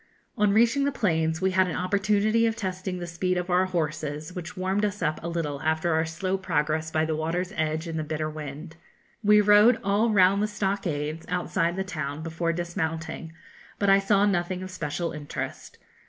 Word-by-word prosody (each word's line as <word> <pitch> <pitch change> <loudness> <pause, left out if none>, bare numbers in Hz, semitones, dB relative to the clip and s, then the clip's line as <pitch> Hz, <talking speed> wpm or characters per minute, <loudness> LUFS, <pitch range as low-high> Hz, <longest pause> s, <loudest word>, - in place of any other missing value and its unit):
On 210 -1 +3
reaching 235 +6 +3
the 285 - +1
plains 160 -9 0
we 190 0 +2
had 185 0 +3
an 175 - -3
opportunity 210 +4 +2
of 225 - -1
testing 185 -3 -4
the 175 - -5
speed 180 +2 -1
of 180 0 -2
our 180 +1 +4
horses, 155 -2 -3
which 180 +2 -7
warmed 190 +3 0
us 205 -2 -1
up 155 -1 0
a 170 - -5
little 150 -5 -3
after 160 +1 +1
our 160 +1 +2
slow 185 +4 -2
progress 160 -3 0
by 155 0 +1
the 160 0 -1
water's 175 +5 -2
edge 155 +1 -1
in 165 -1 -4
the 155 - -1
bitter 155 0 -2
wind. 155 +2 -7 0.5
We 210 0 +6
rode 210 +3 +6
all 205 +4 +2
round 200 -1 +4
the 210 - +1
stockades, 170 -7 -2
outside 175 -1 0
the 190 - -1
town, 155 -4 -4
before 165 +1 -1
dismounting; 165 -1 -4 0.4
but 200 -1 +3
I 195 - +6
saw 200 0 +3
nothing 185 -2 0
of 185 - -7
special 170 0 -3
interest. 150 -2 -6
180 Hz, 190 wpm, -26 LUFS, 160-195 Hz, 0.5 s, We